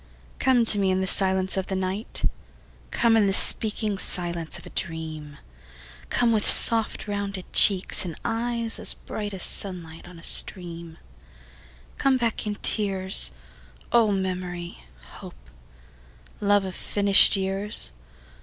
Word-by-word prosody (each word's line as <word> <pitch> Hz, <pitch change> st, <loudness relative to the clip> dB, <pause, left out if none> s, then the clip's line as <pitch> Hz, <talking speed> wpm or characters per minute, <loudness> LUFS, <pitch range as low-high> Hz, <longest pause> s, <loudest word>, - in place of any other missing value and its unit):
Come 250 Hz, -3 st, +1 dB
to 210 Hz, -2 st, +6 dB
me 195 Hz, -1 st, 0 dB
in 185 Hz, 0 st, -1 dB
the 190 Hz, -, -2 dB
silence 190 Hz, 0 st, +1 dB
of 190 Hz, -, -3 dB
the 190 Hz, -, -4 dB
night; 190 Hz, +4 st, -4 dB, 0.6 s
Come 230 Hz, -1 st, +1 dB
in 215 Hz, -3 st, +2 dB
the 195 Hz, -, 0 dB
speaking 210 Hz, 0 st, 0 dB
silence 170 Hz, -4 st, -2 dB
of -, -, -14 dB
a -, -, -13 dB
dream; 155 Hz, -4 st, -6 dB, 0.7 s
Come 240 Hz, -1 st, 0 dB
with 215 Hz, -2 st, 0 dB
soft 225 Hz, -2 st, +5 dB
rounded 200 Hz, -2 st, -6 dB
cheeks 195 Hz, -3 st, +3 dB
and 170 Hz, -4 st, -7 dB
eyes 230 Hz, 0 st, -3 dB
as -, -, +3 dB
bright 210 Hz, -1 st, -8 dB
As 190 Hz, -3 st, -3 dB
sunlight 175 Hz, -4 st, 0 dB
on 180 Hz, -1 st, -14 dB
a 165 Hz, -, -15 dB
stream; 170 Hz, -3 st, 0 dB, 1.0 s
Come 270 Hz, -1 st, +1 dB
back 230 Hz, -3 st, -3 dB
in 205 Hz, -, -4 dB
tears, 195 Hz, -3 st, +1 dB, 0.6 s
O 230 Hz, -3 st, +2 dB
memory, 180 Hz, -2 st, -5 dB, 0.4 s
hope, -, -, -15 dB, 0.9 s
love 205 Hz, -1 st, +1 dB
of 190 Hz, -, -7 dB
finished 200 Hz, +1 st, +5 dB
years. 195 Hz, -, -2 dB
195 Hz, 135 wpm, -23 LUFS, 180-210 Hz, 1.0 s, to